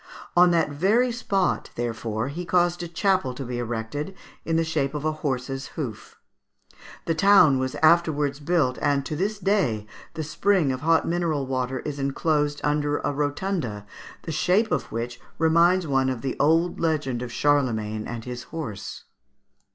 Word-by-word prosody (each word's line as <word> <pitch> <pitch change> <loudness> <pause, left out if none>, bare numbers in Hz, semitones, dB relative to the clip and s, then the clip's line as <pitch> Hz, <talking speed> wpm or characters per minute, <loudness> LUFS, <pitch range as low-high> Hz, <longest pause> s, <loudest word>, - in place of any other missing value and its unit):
On 175 +1 +7
that 165 -3 +2
very 210 - +2
spot 200 -5 0
therefore 115 0 -3
he 170 +5 -5
caused 175 0 +1
a 175 - -4
chapel 185 -6 0
to 135 - -5
be 120 0 -4
erected, 120 +9 -4 0.3
in 165 - -1
the 165 - +3
shape 155 -3 -1
of 150 0 -4
a 155 - +2
horse's 135 -3 -3
hoof. 125 -9 -6 0.9
The 165 - +1
town 160 -6 +5
was 130 0 -2
afterwards 155 -4 +3
built, 145 -5 +1
and 140 -1 +1
to 155 - -3
this 200 +6 -1
day 185 - +1 0.3
the 160 - -3
spring 160 0 +1
of 130 0 -4
hot 165 +1 +3
mineral 165 -5 0
water 130 0 -2
is 145 -1 -5
enclosed 145 +1 0
under 145 0 +1
a 145 - -2
rotunda, 145 - -2 0.4
the 165 - -5
shape 185 +8 +2
of - - -1
which 120 +1 -4 0.2
reminds 170 +3 +4
one 135 -3 +1
of 125 -3 -3
the 135 - -2
old 165 +4 +2
legend 150 -7 0
of 125 -1 -5
Charlemagne 115 -7 0
and 115 -1 -6
his 125 -1 -6
horse. 125 -12 -6
145 Hz, 165 wpm, -25 LUFS, 130-170 Hz, 0.9 s, On